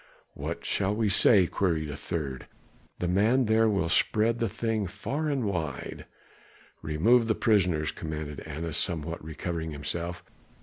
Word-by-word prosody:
"What -, -, -5 dB
shall 100 Hz, +1 st, +1 dB
we 110 Hz, -1 st, +1 dB
say?" 100 Hz, -1 st, +6 dB
queried 80 Hz, -5 st, -1 dB
a -, -, -5 dB
third. 70 Hz, -4 st, -4 dB, 0.5 s
"The 90 Hz, -, -2 dB
man 110 Hz, +8 st, +3 dB
there 110 Hz, 0 st, +4 dB
will 95 Hz, -5 st, +1 dB
spread 110 Hz, +6 st, +2 dB
the 115 Hz, -, 0 dB
thing 110 Hz, -3 st, -1 dB
far 130 Hz, -, -3 dB
and 135 Hz, -5 st, 0 dB
wide." 85 Hz, -8 st, -4 dB, 0.7 s
"Remove 105 Hz, +11 st, +3 dB
the 110 Hz, -, +2 dB
prisoners," 90 Hz, -8 st, +2 dB
commanded 75 Hz, -2 st, -5 dB
Annas, 80 Hz, +1 st, -4 dB
somewhat 85 Hz, -1 st, -2 dB
recovering 80 Hz, +1 st, -4 dB
himself. 85 Hz, +4 st, -4 dB
90 Hz, 140 wpm, -28 LUFS, 80-110 Hz, 0.7 s, say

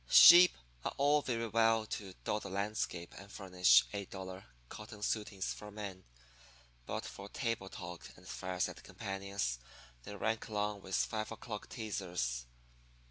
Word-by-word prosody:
Sheep 175 Hz, +2 st, +10 dB, 0.3 s
are -, -, -3 dB
all 145 Hz, +2 st, +4 dB
very 115 Hz, -4 st, -1 dB
well 115 Hz, 0 st, +3 dB
to 100 Hz, -3 st, -6 dB
dot 105 Hz, -, -1 dB
the -, -, -6 dB
landscape 100 Hz, -3 st, -2 dB
and 100 Hz, +1 st, -12 dB
furnish 90 Hz, -, +5 dB
eight 100 Hz, -2 st, -4 dB
dollar 95 Hz, -1 st, -7 dB, 0.2 s
cotton 105 Hz, -, -9 dB
suitings 105 Hz, -3 st, -1 dB
for 105 Hz, -, -9 dB
man, 100 Hz, -3 st, -7 dB, 0.8 s
but -, -, -3 dB
for 100 Hz, +1 st, -8 dB
table 115 Hz, -6 st, -2 dB
talk 85 Hz, -2 st, -8 dB
and 90 Hz, 0 st, -16 dB
fireside 90 Hz, 0 st, -3 dB
companions 95 Hz, -10 st, -3 dB, 0.4 s
they 100 Hz, -, -8 dB
rank 110 Hz, +2 st, -1 dB
along 105 Hz, -2 st, -1 dB
with 95 Hz, -, -3 dB
five 110 Hz, 0 st, -1 dB
o'clock 110 Hz, -1 st, -6 dB
teazers. 90 Hz, -, -3 dB
100 Hz, 140 wpm, -35 LUFS, 95-110 Hz, 0.8 s, Sheep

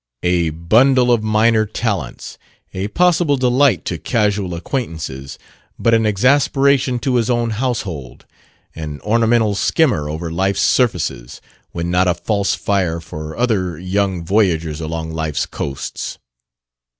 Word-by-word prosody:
A 90 Hz, -2 st, +2 dB
bundle 120 Hz, -, +3 dB
of 120 Hz, -2 st, +3 dB
minor 110 Hz, 0 st, +2 dB
talents; 105 Hz, -1 st, -4 dB, 0.3 s
a 95 Hz, +2 st, -3 dB
possible 170 Hz, +1 st, +2 dB
delight 130 Hz, -2 st, +2 dB
to 85 Hz, -, -3 dB
casual 105 Hz, -6 st, 0 dB
acquaintances, 80 Hz, -, -5 dB, 0.4 s
but 115 Hz, -, +2 dB
an 110 Hz, -1 st, +3 dB
exasperation 135 Hz, +4 st, +2 dB
to 125 Hz, 0 st, 0 dB
his 115 Hz, -1 st, 0 dB
own 120 Hz, -1 st, +1 dB
household; 105 Hz, -, -4 dB, 0.5 s
an 75 Hz, -2 st, -6 dB
ornamental 115 Hz, 0 st, +2 dB
skimmer 100 Hz, -, +1 dB
over 80 Hz, +2 st, -4 dB
life's 95 Hz, +4 st, 0 dB
surfaces, 75 Hz, -, 0 dB, 0.3 s
when 85 Hz, 0 st, -3 dB
not 90 Hz, +1 st, +2 dB
a 90 Hz, -, +2 dB
false 100 Hz, +3 st, 0 dB
fire 90 Hz, -5 st, -1 dB
for 80 Hz, -1 st, -8 dB
other 95 Hz, -9 st, 0 dB
young 95 Hz, 0 st, -1 dB
voyagers 85 Hz, -6 st, +1 dB
along 80 Hz, 0 st, -4 dB
life's 80 Hz, -2 st, -2 dB
coasts. 70 Hz, -2 st, -5 dB
100 Hz, 125 wpm, -18 LUFS, 85-120 Hz, 0.5 s, bundle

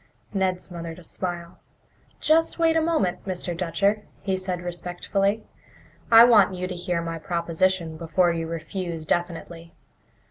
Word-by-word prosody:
Ned 190 Hz, -2 st, +1 dB
smothered 170 Hz, -2 st, -7 dB
a 180 Hz, -, -13 dB
smile. 170 Hz, 0 st, -5 dB, 0.6 s
"Just 325 Hz, +1 st, +3 dB
wait 325 Hz, -1 st, +3 dB
a 320 Hz, -, +4 dB
moment, 315 Hz, -, 0 dB
Mr. 180 Hz, -2 st, -3 dB
Dutcher," 190 Hz, +5 st, +1 dB, 0.2 s
he 195 Hz, -1 st, 0 dB
said 185 Hz, -1 st, -3 dB
respectfully. 180 Hz, +4 st, -2 dB, 0.7 s
"I 225 Hz, 0 st, +10 dB
want 210 Hz, -5 st, +6 dB
you 180 Hz, 0 st, -3 dB
to 185 Hz, -, -5 dB
hear 175 Hz, -1 st, -2 dB
my 165 Hz, 0 st, -4 dB
proposition 170 Hz, 0 st, 0 dB
before 170 Hz, +2 st, +2 dB
you 165 Hz, -1 st, -3 dB
refuse 165 Hz, 0 st, -4 dB
definitely. 170 Hz, 0 st, -3 dB
180 Hz, 140 wpm, -25 LUFS, 170-195 Hz, 0.7 s, I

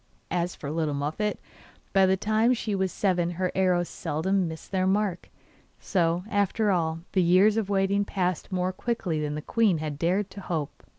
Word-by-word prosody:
As 175 Hz, 0 st, -1 dB
for 145 Hz, -, -6 dB
little 155 Hz, -2 st, -1 dB
Muffette, 155 Hz, +9 st, -1 dB, 0.6 s
by 195 Hz, -1 st, +5 dB
the 190 Hz, 0 st, +3 dB
time 220 Hz, +5 st, +2 dB
she 220 Hz, -2 st, -3 dB
was 190 Hz, -1 st, 0 dB
seven 180 Hz, -4 st, +1 dB
her 185 Hz, -1 st, 0 dB
arrows 180 Hz, -2 st, +2 dB
seldom 185 Hz, +5 st, -1 dB
missed 160 Hz, -1 st, -8 dB
their 185 Hz, -1 st, +1 dB
mark. 195 Hz, -2 st, 0 dB, 0.5 s
So, 175 Hz, -2 st, 0 dB
after 205 Hz, +1 st, +1 dB
all, 165 Hz, -3 st, 0 dB
the 190 Hz, -, +2 dB
years 185 Hz, +5 st, +5 dB
of 220 Hz, -3 st, -1 dB
waiting 200 Hz, 0 st, +2 dB
passed 185 Hz, -3 st, -2 dB
more 185 Hz, 0 st, 0 dB
quickly 185 Hz, -8 st, -2 dB
than 150 Hz, 0 st, -2 dB
the 150 Hz, -, -5 dB
queen 215 Hz, -5 st, +2 dB
had 150 Hz, -2 st, -4 dB
dared 185 Hz, +4 st, 0 dB
to 200 Hz, -, -9 dB
hope. 160 Hz, -6 st, -4 dB
185 Hz, 180 wpm, -27 LUFS, 165-200 Hz, 0.6 s, by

